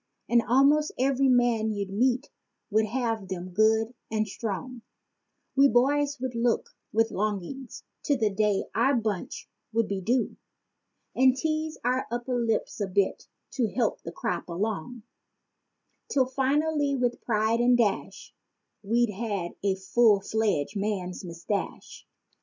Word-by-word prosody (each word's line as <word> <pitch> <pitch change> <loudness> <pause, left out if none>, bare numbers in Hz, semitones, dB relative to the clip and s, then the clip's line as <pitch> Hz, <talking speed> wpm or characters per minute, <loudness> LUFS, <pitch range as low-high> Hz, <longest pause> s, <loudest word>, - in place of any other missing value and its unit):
And 240 0 +4
almost 285 +4 +4
every 270 +1 +2
man 240 -3 +3
you'd 200 -2 -3
meet 250 +6 +1 0.4
would 220 +1 +3
have 225 -3 -2
them 185 -1 -5
good 220 +4 +2 0.2
and 215 -1 0
strong; 230 +4 -5 0.7
We 275 0 +7
boys 280 +4 +2
would 260 0 -3
look 235 0 0 0.2
with 225 +1 +2
longings 215 +5 -4 0.2
to 285 -3 +2
the 220 -3 +1
day 205 0 +1
that - - -11
our 265 +4 +3
bunch 215 -5 -3 0.2
would 225 -1 +1
be 195 -1 -3
due 240 +6 0 0.8
And 260 0 +5
tease 315 +1 -2
our 255 +2 0
upper 240 +1 -2
lip 225 -1 +1
a 200 - 0
bit 195 +1 0 0.2
to 240 -5 0
help 235 -5 0
the 165 - -7
crop - - -3
along— 210 +5 -3 1.1
'Till, 265 -2 +3
finally, 280 +2 +1
with 245 -2 -1
pride 220 0 +1
and 245 0 +4
dash, 220 -4 -1 0.5
we 230 +4 +2
had 200 -4 -3
a 195 -1 +2
full 205 +2 +3
fledged 205 -5 -1
man's 195 -3 -3
mustache. 170 +3 -5
230 Hz, 140 wpm, -27 LUFS, 205-255 Hz, 1.1 s, We